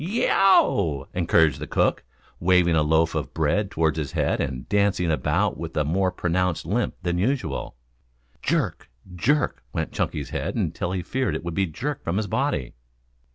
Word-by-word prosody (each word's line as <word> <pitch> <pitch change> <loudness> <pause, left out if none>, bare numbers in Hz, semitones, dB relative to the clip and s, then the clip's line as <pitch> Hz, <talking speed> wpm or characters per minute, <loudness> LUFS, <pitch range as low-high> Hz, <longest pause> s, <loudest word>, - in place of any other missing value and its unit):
"Y - - -3
e 235 +6 +1
o 195 0 +6 0.3
w!" 70 0 -9
encouraged 80 -4 +3
the - - -5
cook, - - +1 0.4
waving 90 -1 +3
a 80 - +4
loaf 80 +2 +2
of - - -4
bread 80 +6 +1
above 80 -1 +2
his 75 -4 -3
head - - 0
and 65 -2 -4
dancing 100 -4 +2
about 75 - 0
with 80 0 -6
a 75 - +3
more 95 +6 +1
pronounced 90 -1 -1
limp 110 +9 -1
than 90 0 0
usual. 130 - -1 0.7
Jerk, - - -1 0.2
jerk, 135 - 0
went - - -2
Chunky's 70 -3 -3
head - - -3
until 85 - -2
he 90 -2 -2
feared 125 -8 -1
it 80 - -4
would 85 - -3
be 95 +2 +1
jerked 135 - -4
from 85 +3 -1
his 110 - 0
body. 65 -9 -1
85 Hz, 180 wpm, -24 LUFS, 80-100 Hz, 0.7 s, o